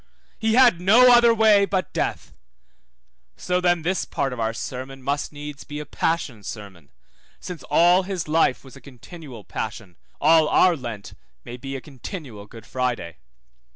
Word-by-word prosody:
he 220 0 +1
had 245 -9 +5
no 240 +7 +6
other 240 -1 +6
way 220 -3 +5
but 190 -2 -2
death: - - -3 1.0
so 180 - -1
then 175 -2 +1
this 185 +3 -1
part 135 -2 -3
of 125 - -8
our 110 0 0
sermon 130 +3 -7
must 140 +2 -2
needs 145 -1 -9
be 150 0 -7
a 150 - -6
passion 150 -11 -2
sermon, 100 -7 -10 0.5
since 180 -3 -8
all 175 +2 +5
his 185 -4 -5
life 155 -4 +1
was 135 -1 -14
a 140 - -14
continual 135 -2 -12
passion, 105 -5 -6 0.2
all 160 0 +4
our 180 -2 +4
Lent 115 -7 -8 0.3
may - - -9
well - - -7
be 135 +1 -6
a 135 - -6
continual 130 - -9
Good 115 +1 -13
Friday. 125 -10 -3
145 Hz, 165 wpm, -23 LUFS, 125-180 Hz, 1.0 s, no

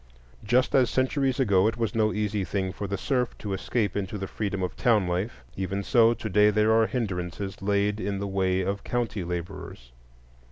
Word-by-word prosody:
Just 125 +4 +2
as 130 -3 +4
centuries 130 0 +1
ago 100 -6 +4
it 110 - -1
was 115 -3 -1
no 110 -1 +2
easy 105 -1 -1
thing 95 -1 -2
for 100 - -5
the 100 +1 -2
serf 125 0 -1
to 100 -2 -4
escape 100 +1 -1
into 100 +1 -3
the 95 - -4
freedom 100 -1 -3
of 90 - -3
town 110 -7 +2
life, 90 +7 -3
even 95 +1 -2
so 115 +2 +4
to 110 - -5
day 105 0 +5
there 105 +1 +3
are 110 0 +4
hindrances 95 -4 -4
laid 100 +1 +1
in 100 0 -2
the 100 - -3
way 95 -1 0
of 100 +2 -2
county 115 -5 -2
laborers. 85 -7 -6
100 Hz, 195 wpm, -26 LUFS, 95-115 Hz, -, day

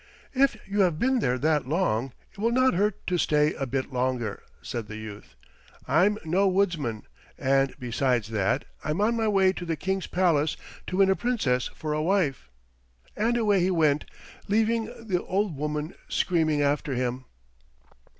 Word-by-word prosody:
"If 270 -3 +3
you 200 +1 -2
have 180 -5 +3
been 260 +6 +2
there 125 - +1
that 150 -1 +1
long 135 - 0 0.2
it - - -18
will 225 +3 +2
not 255 +2 +3
hurt 205 +2 0
to 180 -1 0
stay 150 -1 +2
a 135 - -4
bit 130 +2 -3
longer," 125 -4 -1 0.2
said 115 -3 -4
the 110 - -7
youth. 105 - -10 0.5
"I'm 180 +10 +3
no 185 +5 +2
woodsman, 170 - 0 0.3
and 135 0 +2
besides 125 -3 0
that 110 +4 0 0.2
I'm 155 +4 -2
on 220 +3 +2
my 225 -1 0
way 190 -2 +3
to 180 - -6
the 165 -2 -2
King's 190 +4 -2
palace 160 -5 +1 0.3
to 185 - -3
win 195 -1 +5
a - - +3
Princess 170 - 0
for 155 -1 -3
a 155 - 0
wife." 160 - 0 0.7
And 230 +3 +1
away 210 -4 +3
he 180 +1 +2
went, 155 -5 +2 0.4
leaving 225 +2 +2 0.2
the 180 -5 0
old 195 -3 -1
woman 150 +3 -3 0.2
screaming 155 -4 +1
after 140 -1 0
him. 125 +1 -2
160 Hz, 170 wpm, -26 LUFS, 135-195 Hz, 0.7 s, win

